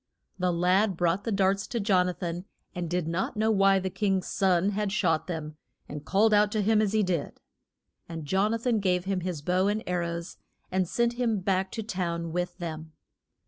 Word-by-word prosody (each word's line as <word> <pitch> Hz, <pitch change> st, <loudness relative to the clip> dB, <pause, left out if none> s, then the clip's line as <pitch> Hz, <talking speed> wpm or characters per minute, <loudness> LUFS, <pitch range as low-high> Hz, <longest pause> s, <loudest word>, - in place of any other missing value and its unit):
The 180 Hz, 0 st, +1 dB
lad 180 Hz, +3 st, +2 dB
brought 175 Hz, +3 st, +1 dB
the 230 Hz, -, -1 dB
darts 195 Hz, 0 st, +1 dB
to 235 Hz, -, -2 dB
Jon 190 Hz, -3 st, +3 dB
a -, -, -2 dB
than, 175 Hz, 0 st, -4 dB, 0.3 s
and 175 Hz, -3 st, -4 dB
did 175 Hz, -1 st, -1 dB
not 175 Hz, +5 st, -2 dB
know 220 Hz, +1 st, +2 dB
why 195 Hz, -2 st, +4 dB
the 190 Hz, 0 st, -2 dB
king's 195 Hz, -2 st, 0 dB
son 190 Hz, 0 st, +2 dB
had 205 Hz, 0 st, -1 dB
shot 180 Hz, -6 st, +1 dB
them 155 Hz, -3 st, -5 dB, 0.3 s
and 145 Hz, 0 st, -7 dB
called 210 Hz, +5 st, +3 dB
out 210 Hz, 0 st, +4 dB
to 215 Hz, -2 st, +1 dB
him 215 Hz, +1 st, +3 dB
as 210 Hz, -1 st, 0 dB
he 215 Hz, -1 st, +3 dB
did. 175 Hz, -6 st, -2 dB, 0.7 s
And 165 Hz, -2 st, -6 dB
Jon 190 Hz, +7 st, +1 dB
a 230 Hz, -, +1 dB
than 230 Hz, -1 st, 0 dB
gave 180 Hz, -2 st, +1 dB
him 195 Hz, -1 st, 0 dB
his 175 Hz, -4 st, -4 dB
bow 185 Hz, +4 st, +2 dB
and 210 Hz, +2 st, 0 dB
ar 180 Hz, 0 st, 0 dB
rows, 170 Hz, 0 st, -4 dB, 0.3 s
and 185 Hz, -1 st, +1 dB
sent 235 Hz, +5 st, +1 dB
him 225 Hz, -4 st, +1 dB
back 190 Hz, 0 st, 0 dB
to 225 Hz, -, -3 dB
town 170 Hz, -5 st, -3 dB
with 175 Hz, +1 st, -3 dB
them. 160 Hz, -3 st, -6 dB
185 Hz, 210 wpm, -28 LUFS, 175-205 Hz, 0.7 s, why